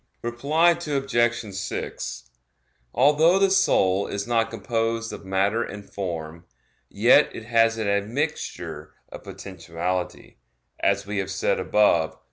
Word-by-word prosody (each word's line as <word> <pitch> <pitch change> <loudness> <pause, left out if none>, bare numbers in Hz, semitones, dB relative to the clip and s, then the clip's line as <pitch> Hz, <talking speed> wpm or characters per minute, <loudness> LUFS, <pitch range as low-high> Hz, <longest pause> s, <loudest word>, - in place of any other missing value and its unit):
Reply 140 +9 +2
Obj. 135 - -1
6: 95 -9 -5 0.7
Although 150 - +4
the 195 0 +3
soul 100 - +3
is 100 0 -4
not 115 -1 +1
composed 115 -2 -2
of - - -9
matter 100 +4 +1
and 105 -3 -7
form, 85 -3 -6 0.4
yet - - +5
it 110 - -8
has 115 0 +3
an 110 -2 -2
admixture 110 +10 -3
of - - -10
potentiality, 90 0 -5 0.4
as 100 0 +1
we 100 0 -3
have 95 0 -3
said 95 - 0
above 85 -7 +2
(Q. - - -27
110 Hz, 125 wpm, -24 LUFS, 95-120 Hz, 0.7 s, yet